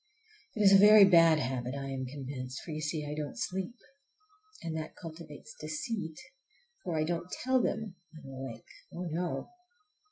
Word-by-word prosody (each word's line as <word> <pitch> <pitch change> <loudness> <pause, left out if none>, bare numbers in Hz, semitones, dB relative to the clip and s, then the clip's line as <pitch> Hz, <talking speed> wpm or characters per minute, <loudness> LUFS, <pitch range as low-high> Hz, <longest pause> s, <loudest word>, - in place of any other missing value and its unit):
It 215 - +1
is 195 -1 +7
a 195 - +9
very 210 0 +9
bad 165 -4 +6
habit, 130 -1 -2
I 135 -1 -4
am 130 -1 -3
convinced, 130 -1 -6
for, 165 - -7
you 155 0 -4
see, 155 -1 -2
I 145 - -4
don't 150 -1 -4
sleep. 190 +6 -3 0.9
And 165 -1 -3
that 160 0 -5
cultivates 165 +4 -10
deceit, 160 +1 -4 0.6
for 170 -3 -2
I 155 - +2
don't 170 +2 -2
tell 260 0 +3
them 220 -3 -2 0.2
I'm 150 - -12
awake,—oh, 135 +6 -8
no! 175 - -3
160 Hz, 160 wpm, -31 LUFS, 140-185 Hz, 0.9 s, a